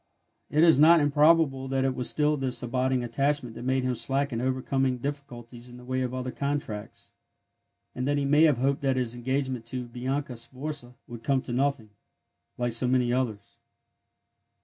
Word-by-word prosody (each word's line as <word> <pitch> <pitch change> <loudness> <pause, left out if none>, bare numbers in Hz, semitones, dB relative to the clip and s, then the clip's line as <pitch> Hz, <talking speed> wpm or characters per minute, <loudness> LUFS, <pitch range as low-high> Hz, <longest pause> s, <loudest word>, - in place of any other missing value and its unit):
It 155 +2 +3
is 165 -5 +6
not 165 +3 +7
improbable 145 -2 +3
that 135 0 0
it 135 - +1
was 125 -1 0
this 150 -4 0
still 125 - -4
abiding 130 +1 0
attachment 135 +1 -1
that - - -9
made 130 +1 0
him 130 0 0
slack 135 +4 -1
in 115 - -2
overcoming 130 0 0
difficulties 125 -3 -7
in 120 - -12
the 125 - -13
way 130 +1 -1
of 125 -1 -2
other 130 0 -4
contracts, 140 -8 -5 0.8
and 125 +1 -3
that 145 0 +1
he 140 - 0
may 150 +3 +5
have 150 -6 +3
hoped 135 +2 0
that 135 -2 +1
his 125 -3 -1
engagement 130 0 -2
to 125 +1 -3
Bianca 130 +2 -4
Sforza 130 +1 -7
would 120 -1 -9
come 135 -2 +1
to 120 - -5
nothing, 130 -4 -1 0.7
like 120 -1 -1
so 120 +2 0
many 125 -1 +2
others. 110 -6 -3
130 Hz, 180 wpm, -27 LUFS, 125-140 Hz, 0.8 s, not